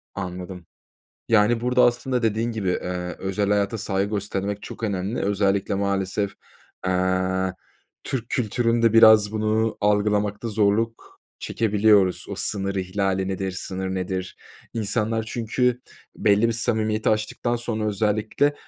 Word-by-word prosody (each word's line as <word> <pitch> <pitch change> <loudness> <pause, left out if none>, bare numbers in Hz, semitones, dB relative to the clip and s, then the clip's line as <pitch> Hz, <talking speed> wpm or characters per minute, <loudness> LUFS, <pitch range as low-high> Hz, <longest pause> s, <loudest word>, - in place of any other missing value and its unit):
Anladım. 90 -1 -6 0.6
Yani, 115 +1 +4
burada 125 +1 +3
aslında 120 +1 +1
dediğin 115 +1 0
gibi, 105 -4 -2
eee, 90 -1 -2
özel 95 +1 -1
hayata 105 +2 +1
saygı 100 -1 -1
göstermek 100 0 -3
çok - - -9
önemli. 100 +1 -2
Özellikle 100 0 +1
maalesef, 100 0 -1 0.5
eee, 95 0 0 0.5
Türk 120 -3 -3
kültüründe 115 -1 +1
biraz 110 -2 +7
bunu 110 +1 0
algılamakta 105 +1 +1
zorluk 110 +2 0 0.2
çekebiliyoruz. 105 -3 +2
O - - -4
sınır 100 -1 -1
ihlali 95 0 -1
nedir, 95 0 -2
sınır 95 +1 -4
nedir? 95 0 -4 0.4
İnsanlar 110 0 -1
çünkü 125 +1 0 0.4
belli 105 +2 +3
bir - - +1
samimiyeti 110 -2 0
aştıktan 110 +3 0
sonra, 115 -2 -3
özellikle, 110 +7 +1
105 Hz, 120 wpm, -24 LUFS, 95-115 Hz, 0.6 s, biraz